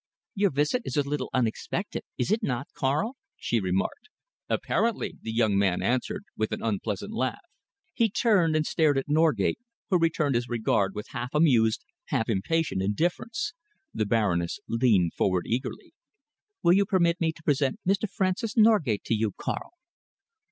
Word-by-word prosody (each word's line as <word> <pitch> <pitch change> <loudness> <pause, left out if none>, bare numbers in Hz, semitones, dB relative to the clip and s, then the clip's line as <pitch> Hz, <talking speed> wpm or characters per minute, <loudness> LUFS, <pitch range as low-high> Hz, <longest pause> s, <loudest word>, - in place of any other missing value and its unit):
"Your 200 0 +2
visit 150 - +1
is - - -4
a 145 -1 +1
little 145 +1 -2
unexpected, 120 -4 -2 0.2
is 125 - -1
it 220 +2 +2
not, 130 - -2
Karl?" 155 - -1 0.2
she 120 - 0
remarked. 95 - -2 0.4
"Apparently!" 230 -1 0
the 110 - -4
young 110 -3 +2
man 95 -3 +2
answered, 125 +9 -1
with 110 0 -1
an - - -4
unpleasant 110 - -2
laugh. 225 - -1 0.6
He 230 -2 +2
turned 195 -7 +3
and 155 0 +2
stared 155 -4 +2
at 135 - -1
Norgate, 155 +5 +2 0.3
who 180 - +4
returned 165 -4 +1
his 120 0 -1
regard 110 -4 +1
with 105 - -6
half 125 +4 -5
amused, 120 -8 +3 0.2
half 115 - -1
impatient 115 +3 0
indifference. 170 - -1 0.4
The 110 - -1
Baroness 95 - +1
leaned 115 -8 +2
forward 90 -2 +1
eagerly. 125 +4 -3 0.7
"Will 170 - +6
you 200 +1 +3
permit 175 -4 +2
me 160 -1 +2
to 160 - -17
present 140 -3 +1
Mr. 195 +2 +1
Francis 200 +6 -1
Norgate 210 - +4
to - - -1
you, 110 -2 0
Karl?" - - -4
140 Hz, 160 wpm, -27 LUFS, 110-175 Hz, 0.7 s, Will